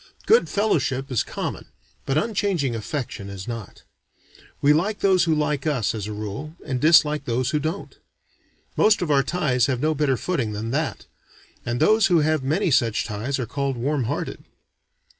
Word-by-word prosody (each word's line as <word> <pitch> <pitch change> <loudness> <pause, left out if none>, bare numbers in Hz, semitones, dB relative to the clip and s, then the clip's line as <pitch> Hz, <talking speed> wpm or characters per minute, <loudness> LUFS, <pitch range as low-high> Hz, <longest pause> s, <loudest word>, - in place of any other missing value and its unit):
Good 460 +2 +4
fellowship 140 - 0
is 125 - +2
common, - - -5 0.4
but 135 - +1
unchanging 190 - 0
affection 115 -3 -5
is 100 +1 -8
not. 115 -4 -7 0.8
We 145 +1 +5
like 195 +7 0
those 185 -3 +4
who 160 -2 +2
like 150 -1 -1
us, 125 -8 0
as 105 -2 -4
a - - -5
rule, 110 +9 -6
and 130 -2 -2
dislike 150 -2 +4
those 125 +3 0
who 150 - +1
don't. 160 +7 -5 0.8
Most 215 -3 +4
of 155 - -1
our 140 -1 +5
ties 135 -5 +1
have 130 -3 -1
no 155 +4 +1
better 140 -3 +1
footing 125 -9 -2
than 110 +2 -4
that; 150 +2 -2 0.6
and 120 +1 -1
those 220 -1 +4
who 175 -4 +4
have 155 -1 +1
many 150 +5 0
such 115 -3 +2
ties 115 +6 -3
are 125 - -2
called 135 +2 -2
warm 135 +1 -1
hearted. - - -4
140 Hz, 175 wpm, -23 LUFS, 120-160 Hz, 0.8 s, We